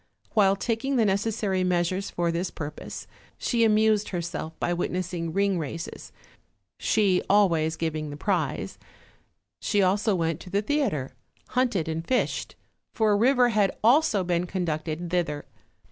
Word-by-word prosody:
While 195 Hz, -2 st, +4 dB
taking 235 Hz, +6 st, -1 dB
the 230 Hz, -3 st, +3 dB
necessary 200 Hz, -1 st, 0 dB
measures 180 Hz, +2 st, 0 dB
for 170 Hz, -1 st, -1 dB
this 175 Hz, +2 st, -2 dB
purpose, 150 Hz, -2 st, -7 dB, 0.3 s
she 235 Hz, -2 st, +1 dB
amused 215 Hz, -1 st, +3 dB
herself 170 Hz, -2 st, -4 dB
by 175 Hz, -, 0 dB
witness 180 Hz, +1 st, -2 dB
ing 165 Hz, -2 st, -3 dB
ring 195 Hz, 0 st, +1 dB
races, 165 Hz, +2 st, -6 dB, 0.7 s
she 200 Hz, -4 st, +2 dB
always 170 Hz, -6 st, +3 dB
giving 155 Hz, -2 st, -3 dB
the 145 Hz, -, -7 dB
prize; 155 Hz, -, -2 dB, 0.8 s
she 205 Hz, -1 st, +1 dB
also 200 Hz, +2 st, +2 dB
went 165 Hz, -2 st, -1 dB
to -, -, -11 dB
the 200 Hz, +3 st, 0 dB
theater, 210 Hz, -, 0 dB, 0.4 s
hunted 240 Hz, -10 st, +1 dB
and 160 Hz, 0 st, -2 dB
fished; 250 Hz, +8 st, -1 dB, 0.4 s
for 220 Hz, -2 st, +3 dB
a -, -, +4 dB
river 245 Hz, +3 st, +4 dB
had 210 Hz, -4 st, +1 dB
also 235 Hz, -4 st, +4 dB
been 175 Hz, 0 st, 0 dB
conducted 170 Hz, -1 st, -3 dB
thither. 155 Hz, -5 st, -1 dB
185 Hz, 145 wpm, -26 LUFS, 165-215 Hz, 0.8 s, While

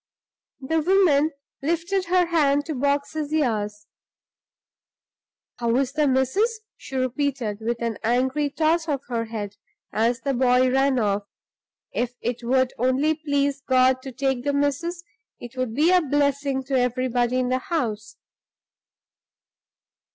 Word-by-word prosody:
The 320 Hz, +5 st, 0 dB
woman 320 Hz, -4 st, +4 dB, 0.3 s
lifted 340 Hz, +5 st, -1 dB
her 360 Hz, +1 st, +3 dB
hand 290 Hz, -4 st, +2 dB
to 320 Hz, -, -3 dB
box 280 Hz, +2 st, 0 dB
his 305 Hz, -1 st, -3 dB
ears. 210 Hz, -8 st, -1 dB, 1.7 s
"How 235 Hz, -1 st, 0 dB
is 270 Hz, 0 st, +1 dB
the 300 Hz, 0 st, +2 dB
missus?" 385 Hz, -, +1 dB
she 270 Hz, -, -10 dB
repeated, 255 Hz, -4 st, -1 dB
with 235 Hz, +1 st, -2 dB
an 230 Hz, -3 st, -2 dB
angry 260 Hz, +5 st, +1 dB
toss 320 Hz, +3 st, +1 dB
of 285 Hz, -4 st, -1 dB
her 230 Hz, -2 st, -1 dB
head, 205 Hz, -3 st, -6 dB, 0.4 s
as 230 Hz, +2 st, +1 dB
the 275 Hz, +1 st, -1 dB
boy 255 Hz, 0 st, +3 dB
ran 270 Hz, 0 st, +2 dB
off. 205 Hz, -3 st, 0 dB, 0.7 s
"If 245 Hz, 0 st, -2 dB
it 240 Hz, 0 st, -3 dB
would 260 Hz, +1 st, +2 dB
only 260 Hz, +5 st, +2 dB
please 285 Hz, -2 st, -1 dB
God 260 Hz, -1 st, +3 dB
to 265 Hz, -, -7 dB
take 265 Hz, -1 st, -1 dB
the 285 Hz, 0 st, 0 dB
missus, 290 Hz, +5 st, -1 dB, 0.4 s
it 240 Hz, +1 st, -10 dB
would 255 Hz, -3 st, -2 dB
be 315 Hz, +6 st, +4 dB
a 365 Hz, -1 st, +5 dB
blessing 280 Hz, -2 st, 0 dB
to 265 Hz, 0 st, 0 dB
everybody 250 Hz, 0 st, 0 dB
in 255 Hz, -1 st, 0 dB
the 255 Hz, 0 st, +1 dB
house." 225 Hz, -9 st, -3 dB
265 Hz, 140 wpm, -24 LUFS, 245-295 Hz, 1.7 s, a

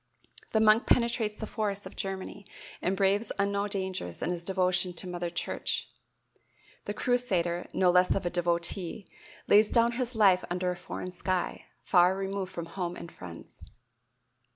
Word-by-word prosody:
The 220 Hz, -, +4 dB
monk 220 Hz, +1 st, +5 dB
penetrates 235 Hz, -3 st, +2 dB
the 220 Hz, -, -5 dB
forests 205 Hz, -2 st, -2 dB
of -, -, -9 dB
Germany 195 Hz, +1 st, -5 dB, 0.3 s
and 190 Hz, +1 st, 0 dB
braves 200 Hz, +3 st, +2 dB
unknown 200 Hz, 0 st, 0 dB
dangers 190 Hz, -, -3 dB
in 175 Hz, -, 0 dB
his 175 Hz, -1 st, -3 dB
devotion 185 Hz, -1 st, +1 dB
to 175 Hz, -, 0 dB
mother 175 Hz, -1 st, -3 dB
church; 170 Hz, -, -2 dB, 1.0 s
the 205 Hz, -, -3 dB
crusader, 185 Hz, -10 st, 0 dB
no 180 Hz, -1 st, +3 dB
less 180 Hz, 0 st, +4 dB
of 195 Hz, -2 st, -2 dB
a 175 Hz, -, 0 dB
devotee, 175 Hz, +2 st, -1 dB, 0.4 s
lays 210 Hz, +1 st, +6 dB
down 235 Hz, 0 st, +3 dB
his 245 Hz, 0 st, -3 dB
life 195 Hz, -4 st, +5 dB
under 180 Hz, +1 st, 0 dB
a -, -, -4 dB
foreign 180 Hz, +1 st, -6 dB
sky, 185 Hz, 0 st, -2 dB, 0.2 s
far 180 Hz, +1 st, +4 dB
removed 195 Hz, -1 st, -3 dB
from 170 Hz, -, -5 dB
home 175 Hz, +1 st, -4 dB
and 170 Hz, -, -9 dB
friends. 85 Hz, -2 st, -11 dB
190 Hz, 155 wpm, -29 LUFS, 175-205 Hz, 1.0 s, lays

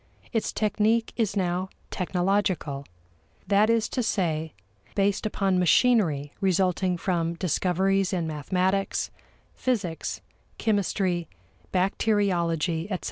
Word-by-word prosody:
Its 225 Hz, -, 0 dB
technique 215 Hz, +2 st, +1 dB
is 220 Hz, -4 st, 0 dB
now 185 Hz, 0 st, 0 dB, 0.2 s
technological: 180 Hz, -6 st, 0 dB, 0.6 s
that 205 Hz, +2 st, +4 dB
is 230 Hz, -1 st, +3 dB
to 255 Hz, -, -2 dB
say, 160 Hz, -8 st, -1 dB, 0.4 s
based 200 Hz, +1 st, +1 dB
upon 195 Hz, -3 st, +1 dB
machinery 175 Hz, -, +3 dB
resulting 185 Hz, -1 st, +2 dB
from 170 Hz, -2 st, -1 dB
discoveries 190 Hz, +3 st, +1 dB
in 175 Hz, -4 st, -1 dB
mathematics, 185 Hz, +6 st, 0 dB, 0.4 s
physics, 205 Hz, -11 st, -2 dB, 0.4 s
chemistry, 190 Hz, -5 st, 0 dB, 0.4 s
bacteriology, 180 Hz, -4 st, +1 dB
etc. 190 Hz, -3 st, -2 dB
185 Hz, 95 wpm, -26 LUFS, 170-205 Hz, 0.6 s, that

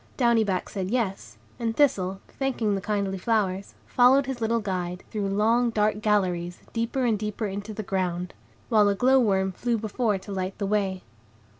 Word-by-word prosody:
Downy 235 Hz, -3 st, +4 dB
Back 190 Hz, -3 st, -1 dB
said, 190 Hz, -2 st, -4 dB
"Yes," 195 Hz, -, -2 dB, 0.2 s
and 230 Hz, -1 st, -2 dB
Thistle, 195 Hz, -10 st, +2 dB
thanking 245 Hz, -6 st, -1 dB
the 195 Hz, -, -1 dB
kindly 200 Hz, -2 st, -1 dB
flowers, 200 Hz, -3 st, -1 dB
followed 260 Hz, +2 st, +5 dB
his 260 Hz, -2 st, -5 dB
little 230 Hz, +1 st, +1 dB
guide, 180 Hz, -3 st, -3 dB
through 205 Hz, -2 st, -2 dB
long, 225 Hz, +5 st, +2 dB
dark 215 Hz, -1 st, +1 dB
galleries, 180 Hz, -5 st, 0 dB, 0.2 s
deeper 230 Hz, +3 st, -1 dB
and 220 Hz, -4 st, +1 dB
deeper 210 Hz, +1 st, -3 dB
into 200 Hz, +2 st, -5 dB
the 215 Hz, 0 st, -5 dB
ground; 180 Hz, -2 st, -2 dB, 0.4 s
while 210 Hz, -3 st, +5 dB
a 200 Hz, -, +1 dB
glow 260 Hz, +5 st, +4 dB
worm 190 Hz, -5 st, +2 dB
flew 235 Hz, +5 st, -1 dB
before 220 Hz, 0 st, 0 dB
to 195 Hz, +2 st, -10 dB
light 190 Hz, 0 st, -3 dB
the 205 Hz, -, -2 dB
way. 195 Hz, -2 st, 0 dB
210 Hz, 175 wpm, -26 LUFS, 190-230 Hz, 0.4 s, followed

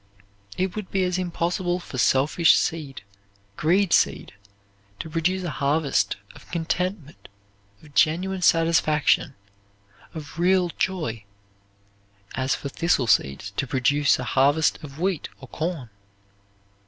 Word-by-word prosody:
It 185 Hz, 0 st, -1 dB
would 210 Hz, -3 st, -5 dB
be 190 Hz, -1 st, 0 dB
as 180 Hz, 0 st, 0 dB
impossible 175 Hz, 0 st, -1 dB
for 135 Hz, -7 st, -7 dB
selfish 145 Hz, +6 st, +4 dB
seed, 145 Hz, -7 st, -3 dB, 0.5 s
greed 180 Hz, -, +2 dB
seed -, -, +1 dB, 0.6 s
to 160 Hz, -, -7 dB
produce 180 Hz, +4 st, 0 dB
a 175 Hz, -, -3 dB
harvest 145 Hz, 0 st, 0 dB, 0.2 s
of -, -, -17 dB
contentment, 175 Hz, -1 st, -3 dB, 0.5 s
of 150 Hz, -2 st, -17 dB
genuine 180 Hz, +6 st, +1 dB
satisfaction, 165 Hz, -5 st, +2 dB, 0.8 s
of 155 Hz, +1 st, -8 dB
real 180 Hz, 0 st, +3 dB
joy, 155 Hz, -, -2 dB, 1.1 s
as 130 Hz, +1 st, 0 dB
for 140 Hz, -, -6 dB
thistle 155 Hz, -3 st, +1 dB
seeds 100 Hz, -3 st, +1 dB
to 135 Hz, +7 st, -3 dB
produce 140 Hz, +3 st, +2 dB
a 125 Hz, -, -4 dB
harvest 135 Hz, -4 st, +2 dB
of 145 Hz, 0 st, -10 dB
wheat 185 Hz, -3 st, -1 dB
or 135 Hz, -, -11 dB
corn. 155 Hz, -6 st, -4 dB
160 Hz, 120 wpm, -24 LUFS, 140-180 Hz, 1.1 s, selfish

